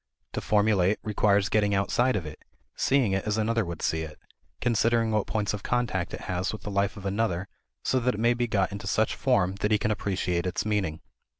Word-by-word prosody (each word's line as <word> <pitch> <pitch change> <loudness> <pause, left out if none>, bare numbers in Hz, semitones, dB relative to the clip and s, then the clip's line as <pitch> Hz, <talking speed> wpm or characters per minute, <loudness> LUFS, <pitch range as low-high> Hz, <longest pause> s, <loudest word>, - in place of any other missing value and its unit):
To - - -2
formulate 105 -2 +3
requires 105 -2 +2
getting 105 -1 +2
outside 120 +6 +2
of 90 - -2
it, 75 0 -8 0.4
seeing 130 -6 +2
it 95 0 0
as 105 0 0
another 115 +1 +1
would 85 -2 -6
see 80 - 0
it, 80 -1 -7 0.4
considering 115 -1 +2
what 105 -1 0
points 105 -2 -1
of 105 - -4
contact 115 -8 -1
it - - -10
has 90 +1 -2
with 110 - -8
the 105 - -5
life 100 0 0
of 100 - -9
another 100 -2 -1 0.4
so 130 - +2
that 125 -1 0
it - - -6
may 120 +2 +4
be 120 0 -1
got 100 -3 +1
into 100 0 -6
such 110 +2 +1
form 100 -7 +1
that 105 - 0
he 105 - +4
can 105 +1 0
appreciate 95 -4 -1
its 90 - -2
meaning. 100 -7 -1
105 Hz, 215 wpm, -27 LUFS, 95-110 Hz, 0.4 s, may